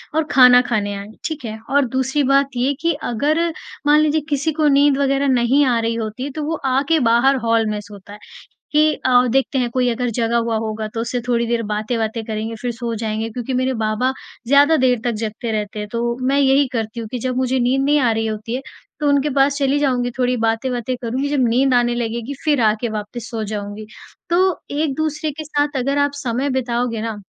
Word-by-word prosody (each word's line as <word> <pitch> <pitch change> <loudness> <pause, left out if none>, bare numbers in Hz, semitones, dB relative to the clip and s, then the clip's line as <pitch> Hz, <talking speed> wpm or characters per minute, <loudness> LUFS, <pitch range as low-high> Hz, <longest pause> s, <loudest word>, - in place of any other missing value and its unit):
और 320 - +3
खाना 250 -1 +7
खाने 205 -3 0
आए। 200 0 -7 0.2
ठीक 305 -4 -4
है? 220 0 -6
और 285 0 +3
दूसरी 265 +3 0
बात 275 +1 +3
ये 255 +3 +1
कि 335 0 +2
अगर 290 +8 0 0.5
मान 295 +1 +6
लीजिए 310 0 +2
किसी 290 +2 0
को 310 0 +1
नींद 285 0 +4
वग़ैरह 275 0 +1
नहीं 260 +2 +3
आ 245 -3 +2
रही 230 0 -1
होती 230 +4 -4
तो 310 - -3
वो 315 +2 -2
आके 275 +5 +2
बाहर 245 +2 +3
हॉल 230 -1 +2
में 210 0 -2
सोता 205 0 -13
है 210 - -11 0.5
कि 305 0 +4
अ, 250 -1 +3
देखते 270 +1 +1
हैं 245 -1 0
कोई 250 -1 +2
अगर 245 +1 -1
जगा 235 -1 +1
हुआ 230 -1 0
होगा 220 0 -3
तो 225 - -2
उससे 245 +1 -2
थोड़ी 235 -1 +1
देर 235 0 0
बातें-वातें 220 +1 -2
करेंगे 220 +1 -4
फ़िर 245 - -2
सो 235 0 -4
जाएँगे 220 0 -3
क्योंकि 245 +3 -5
मेरे 255 +1 0
बाबा 220 +2 0 0.4
ज़्यादा 285 +4 +5
देर 255 -3 +2
तक 240 - 0
जगते 220 +1 -4
रहते 210 -1 -3
हैं, 210 - -4
तो 235 0 -1
मैं 270 +2 +2
यही 275 0 +4
करती 225 0 -3
हूँ 225 - -5
कि 250 - -3
जब 255 +1 -2
मुझे 260 0 +1
नींद 250 +2 +1
नहीं 295 +1 +3
आ 245 -4 +2
रही 225 0 -1
होती 220 +2 -4
है 260 - -3 0.4
तो 300 - 0
उनके 285 +1 +2
पास 280 0 +2
चली 280 0 +1
जाऊँगी 250 -4 0
थोड़ी 250 0 +2
बातें-वातें 240 +2 -1
करूँगी 255 +4 -2
जब 285 -2 +1
नींद 255 +3 +2
आने 240 -1 +2
लगेगी 235 +2 -3
फ़िर 295 -5 +2
आके 220 +2 +1
वापस 215 +2 -6
सो 225 -2 -3
जाऊँगी। 205 0 -5 0.4
तो 365 +1 +2
एक-दूसरे 310 +1 -1
के 310 +2 -7
साथ 290 -1 -1
अगर 275 +2 0
आप 285 0 +2
समय 255 +3 -1
बिताओगे 245 -3 -1
ना 225 -1 -3
250 Hz, 215 wpm, -19 LUFS, 225-280 Hz, 0.5 s, खाना